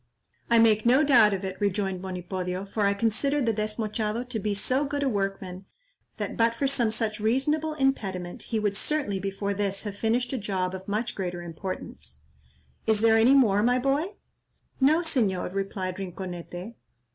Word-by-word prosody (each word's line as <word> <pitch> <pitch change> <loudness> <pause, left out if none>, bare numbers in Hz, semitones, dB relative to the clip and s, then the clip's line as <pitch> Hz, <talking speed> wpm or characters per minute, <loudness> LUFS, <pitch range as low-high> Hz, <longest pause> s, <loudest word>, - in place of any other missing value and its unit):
"I 235 - +5
make 220 -2 +5
no 255 +5 +5
doubt 240 -8 +6
of 195 -1 -2
it," 190 0 -5
rejoined 195 -2 0
Monipodio, 185 0 -4
"for 200 +1 0
I 200 - +2
consider 230 +7 +1
the 230 -5 +1
Desmochado 215 +1 -2
to 235 -3 -2
be 205 0 -1
so 255 +7 +1
good 285 0 -2
a - - +1
workman, 195 -4 -3 0.5
that - - -3
but 230 0 +2
for 275 +4 0
some 245 -4 +2
such 215 -1 -1
reasonable 295 +8 +1
impediment 195 -11 -1
he 225 - 0
would 205 -2 0
certainly 265 -6 -1
before 195 +1 -2
this 200 -1 -1
have 205 -2 -5
finished 240 +4 0
a 260 - -1
job 190 -3 -2
of 190 0 -7
much 215 +4 -1
greater 175 -2 -4
importance. 175 +3 -7 0.6
Is 220 -1 +3
there 225 0 +5
any 240 +5 +6
more, 210 -7 +4
my 245 +3 +3
boy?" 285 +10 0 0.6
"No, 300 +5 +4
Señor," 215 - 0
replied 195 -2 -3
Rinconete. 180 +1 -6
210 Hz, 170 wpm, -27 LUFS, 195-245 Hz, 0.6 s, doubt